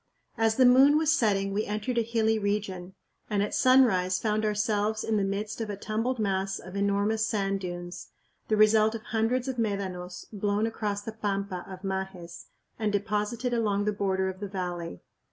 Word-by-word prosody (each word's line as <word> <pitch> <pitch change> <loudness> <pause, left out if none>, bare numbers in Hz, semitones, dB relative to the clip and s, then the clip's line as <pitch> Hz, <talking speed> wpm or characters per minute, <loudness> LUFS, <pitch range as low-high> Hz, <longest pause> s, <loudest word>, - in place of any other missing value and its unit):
As 225 -1 +2
the 255 - +5
moon 265 +4 +7
was 315 0 +3
setting 200 -8 +1
we 210 +2 0
entered 215 +4 -1
a - - +3
hilly 225 -1 +1
region, 195 -3 -3 0.3
and 205 -2 +1
at 205 - -3
sunrise 200 -9 +4
found 215 -1 0
ourselves 210 0 0
in 220 - 0
the 205 - +2
midst 205 +3 -3
of 220 - -3
a 205 - -3
tumbled 225 +5 -2
mass 195 -2 -1
of 185 +1 -10
enormous 200 +2 +1
sand 195 -2 0
dunes 175 -1 -6 0.4
the 215 - +1
result 215 +1 +5
of 225 - -6
hundreds 230 +3 0
of 260 -2 -3
médanos 190 -5 -3
blown 205 +1 0
across 210 -2 -3
the 225 - -5
pampa 200 -4 -3
of 190 0 -9
Majes 190 -3 -5 0.3
and 215 -2 0
deposited 210 +4 -1
along 205 -3 +1
the 210 - +1
border 190 -2 0
of 190 0 -5
the 205 - -4
valley. 175 - -5
210 Hz, 180 wpm, -28 LUFS, 195-220 Hz, 0.4 s, moon